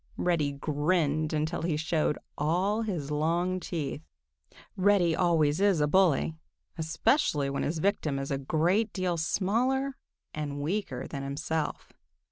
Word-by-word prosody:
Reddy 160 -5 +1
grinned 150 +1 0
until 155 +2 -1
he 165 -2 0
showed 155 -1 0 0.2
all 185 +9 +1
his 175 -10 -3
long 170 +5 0
teeth. 155 -5 -4 0.7
Reddy 185 -4 +3
always 165 -2 +2
is 200 -5 +4
a 150 - +3
bully, 150 - +3 0.4
especially 155 - +1
when 140 - -2
his 160 - -1
victim 155 -5 0
is 135 +1 -4
a 135 - 0
great 175 +10 +1
deal 185 -2 0
smaller 240 +11 0 0.4
and 145 -2 -4
weaker 150 -4 -2
than 140 - -5
himself. 150 +3 -3
160 Hz, 130 wpm, -29 LUFS, 150-185 Hz, 0.7 s, is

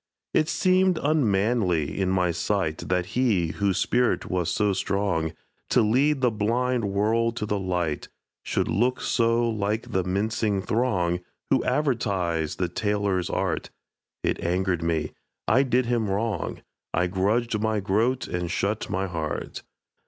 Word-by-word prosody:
It 155 - +2
seemed 185 -1 +3
unmanly 105 - +1
in 95 - +1
my 90 -2 +2
sight 85 -1 -1
That 90 -1 +1
he, 105 -10 +2
whose 100 +1 0
spirit 125 0 +1
was 90 -2 0
so 105 +2 +1
strong 95 -4 0 0.4
To 120 - +4
lead 135 +6 +2
the 125 -2 +3
blind 120 +3 0
world 110 +4 +1
to 105 - -1
the 105 -1 -1
light, 90 -5 -2 0.3
Should - - -1
look 125 +4 +1
so 115 0 +2
like 110 0 -2
the 95 - +1
mincing 100 +1 0
throng 95 -8 +1 0.3
Who - - +3
advertise 95 - 0
the 90 - -1
tailor's 100 -1 -1
art. - - -1 0.5
It - - -1
angered 90 0 0
me 80 -2 -1 0.4
I 130 - +5
did 130 -2 +2
him 115 -3 0
wrong 105 -1 -2 0.3
I 90 - +2
grudged 105 +5 0
my 110 -1 +1
groat 110 +7 +1
and 90 -1 -3
shut 105 +4 -1
my 95 +1 -1
heart. 80 -5 -4
100 Hz, 145 wpm, -25 LUFS, 90-115 Hz, 0.5 s, I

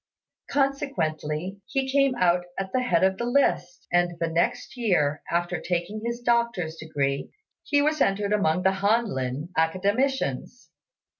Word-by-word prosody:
Consequently, 190 - -1
he 270 -1 -1
came 275 -2 +3
out 180 -4 +2
at 190 -1 -4
the 255 - +2
head 185 -9 +2
of 190 0 +2
the 235 - -1
list; 240 -8 +1
and 175 -1 +2
the 165 - 0
next 170 +7 -1
year, 175 - +1
after 175 +1 -1
taking 180 +4 -2
his 235 +1 -3
doctor's 235 -9 0
degree, 140 -4 -2 0.3
he 285 -1 +2
was 305 0 +1
entered 200 +1 +1
among 180 -4 +1
the 190 - +4
Han 225 +4 +3
lin 135 - -3
Academicians. 200 - 0
190 Hz, 145 wpm, -26 LUFS, 165-240 Hz, 0.3 s, the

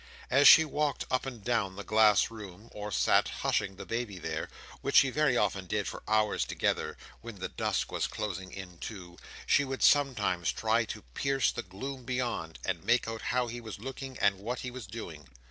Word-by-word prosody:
As 140 +2 +7
she 160 - +10
walked 150 -1 -1
up 130 +1 0
and 120 -6 -7
down 105 -5 0
the 100 - -6
glass 110 -1 +4
room, 105 0 -10
or 105 0 -6
sat - - +3
hushing 95 - -1
the 95 - -8
baby 115 -4 -3
there—which 80 -2 -5
she 135 - +7
very 150 -3 +2
often 95 -5 0
did 105 +2 -1
for - - -6
hours 110 0 +2
together, - - -1 0.2
when 115 -1 -8
the 95 - -4
dusk - - -1
was - - -1
closing 95 -3 -5
in, 90 -3 -9
too—she 95 +6 -2
would 135 -1 -3
sometimes 115 - +3
try - - +1
to - - -7
pierce 135 - +1
the - - -4
gloom 125 +8 -7
beyond, 120 -10 -3
and 90 -4 -2
make 120 -1 +2
out 115 0 -4
how 125 0 0
he 120 +1 -6
was 110 -3 -7
looking 135 +3 -7
and 100 -2 +2
what 120 +5 -4
he 125 - -5
was 125 -5 -8
doing. 85 - -8
110 Hz, 190 wpm, -30 LUFS, 95-125 Hz, 0.2 s, she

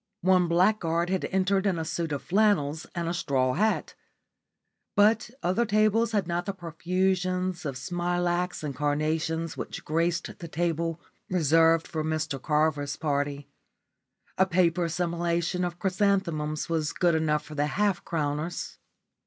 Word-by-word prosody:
One 185 -1 +4
blackguard 170 -1 +2
had 190 - 0
entered 190 +1 +1
in 185 -3 +1
a 160 - -3
suit 165 0 -3
of 145 - -3
flannels 175 -6 +1
and 170 -1 -2
a 170 - -1
straw 130 -7 +1
hat. 215 +6 0 1.0
But 215 +2 +4
other 185 +7 +2
tables 215 +1 +2
had 205 -5 0
not 175 0 -2
the 200 - -1
profusion 185 +1 -1
of 155 -7 -5
smilax 175 +3 -1
and 140 -3 -4
carnations 155 +3 -1
which - - -6
graced 170 +2 -1
the 170 - -7
table 165 0 -1 0.3
reserved 165 -1 +3
for 155 -2 -3
Mr 155 -3 -2
Carver's 150 -1 +1
party. 145 -2 -2 0.9
A 190 - +5
paper 175 -1 +2
simulation 170 +1 -1
of 175 -1 -3
chrysanthemums 180 -5 0
was 160 -2 -1
good 175 -2 +2
enough 155 -1 +1
for 155 - -10
the 145 0 0
half 200 +4 0
crowners. 155 +1 -3
170 Hz, 140 wpm, -27 LUFS, 155-185 Hz, 1.0 s, A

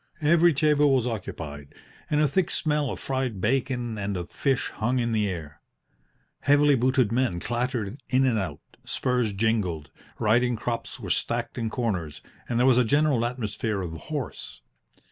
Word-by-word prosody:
Every 170 +3 +5
table 150 0 +4
was 125 -3 +1
occupied, 80 - -6 0.3
and 150 - +2
a 150 - +4
thick 180 +5 +1
smell 150 -3 0
of - - -5
fried 130 -6 -2
bacon 120 0 -1
and 100 -1 -2
of 85 -1 -6
fish 135 -2 0
hung 125 +4 -1
in 120 -1 0
the 105 -2 +1
air. 75 -5 -7 0.8
Heavily 145 +1 +4
booted 130 -3 +2
men 120 -7 +1
clattered 120 +1 -2
in 130 +1 +3
and 120 -4 +2
out, 80 -6 -4 0.2
spurs 125 -4 0
jingled, 95 -7 -1 0.3
riding 120 +3 +2
crops 115 +1 -4
were - - -4
stacked 120 +1 -1
in 115 -1 -1
corners, 95 -11 -3 0.3
and 120 - 0
there 125 - +4
was 130 -2 +5
a - - +5
general 140 0 +2
atmosphere 110 -4 -2
of 85 - -4
horse. 145 - -6
120 Hz, 165 wpm, -26 LUFS, 105-130 Hz, 0.8 s, Every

